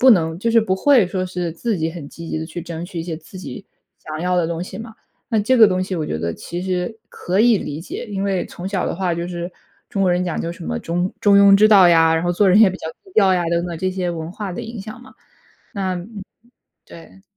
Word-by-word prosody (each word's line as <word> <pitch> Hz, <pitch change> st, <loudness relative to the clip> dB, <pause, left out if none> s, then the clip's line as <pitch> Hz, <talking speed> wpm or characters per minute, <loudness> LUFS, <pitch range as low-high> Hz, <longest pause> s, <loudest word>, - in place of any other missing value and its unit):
不 260 Hz, 0 st, +7 dB
能 160 Hz, -5 st, +3 dB
就 230 Hz, +5 st, 0 dB
是 230 Hz, 0 st, +5 dB
不 190 Hz, -3 st, 0 dB
会 245 Hz, 0 st, +4 dB
说 185 Hz, 0 st, -2 dB
是 180 Hz, -2 st, -3 dB
自 210 Hz, +4 st, -2 dB
己 160 Hz, 0 st, -1 dB
很 160 Hz, -4 st, -8 dB
积 165 Hz, +2 st, -10 dB
极 -, -, -2 dB
地 160 Hz, -, -4 dB
去 160 Hz, +2 st, -7 dB
争 170 Hz, 0 st, -6 dB
取 175 Hz, -1 st, -7 dB
一 -, -, -2 dB
些， 165 Hz, -1 st, -5 dB
自 165 Hz, +4 st, -12 dB
己 190 Hz, +2 st, -8 dB, 0.3 s
想 155 Hz, 0 st, -7 dB
要 180 Hz, +1 st, 0 dB
的 175 Hz, -, +2 dB
东 170 Hz, +1 st, -3 dB
西 -, -, -8 dB
嘛。 225 Hz, 0 st, -9 dB, 0.3 s
那 225 Hz, -3 st, +1 dB
这 255 Hz, +5 st, +2 dB
个 225 Hz, -3 st, +8 dB
东 185 Hz, -1 st, 0 dB
西 185 Hz, 0 st, -4 dB
我 160 Hz, -3 st, -2 dB
觉 80 Hz, -, -3 dB
得 85 Hz, +1 st, -3 dB
其 175 Hz, +1 st, -6 dB
实 185 Hz, +4 st, -3 dB
可 185 Hz, +2 st, -3 dB
以 235 Hz, 0 st, +5 dB
理 150 Hz, -2 st, -5 dB
解， 170 Hz, -, -6 dB
因 195 Hz, 0 st, -2 dB
为 190 Hz, -2 st, 0 dB
从 180 Hz, +2 st, -7 dB
小 195 Hz, -2 st, -1 dB
的 -, -, -2 dB
话 180 Hz, -1 st, -1 dB
就 170 Hz, +1 st, -3 dB
是 175 Hz, 0 st, -5 dB, 0.4 s
中 195 Hz, -, -1 dB
国 185 Hz, -, +3 dB
人 180 Hz, +1 st, +1 dB
讲 175 Hz, -, -2 dB
究 165 Hz, -, -3 dB
什 170 Hz, -, -9 dB
么 80 Hz, 0 st, -2 dB
中 175 Hz, +2 st, -2 dB
中 200 Hz, -1 st, +5 dB
庸 200 Hz, 0 st, +7 dB
之 215 Hz, +2 st, +6 dB
道 195 Hz, -4 st, +7 dB
呀， 165 Hz, -1 st, +5 dB
然 160 Hz, -, 0 dB
后 175 Hz, -, +1 dB
做 195 Hz, +2 st, +3 dB
人 200 Hz, +4 st, +6 dB
也 220 Hz, -, +8 dB
比 185 Hz, -, -5 dB
较 160 Hz, -, -6 dB, 0.2 s
低 385 Hz, -, -18 dB
调 195 Hz, -3 st, +5 dB
呀， 180 Hz, -1 st, +1 dB
等 170 Hz, 0 st, +1 dB
等 170 Hz, -2 st, -5 dB
这 185 Hz, -, 0 dB
些 185 Hz, -1 st, -2 dB
文 160 Hz, -1 st, -5 dB
化 205 Hz, 0 st, -5 dB
的 -, -, -5 dB
影 225 Hz, -1 st, -7 dB
响 215 Hz, +5 st, -9 dB
嘛。 260 Hz, +1 st, -16 dB, 0.6 s
那 190 Hz, -4 st, -2 dB
嗯， 195 Hz, +3 st, -8 dB, 0.6 s
对。 170 Hz, +4 st, -15 dB
180 Hz, 295 characters per minute, -20 LUFS, 170-200 Hz, 0.6 s, 个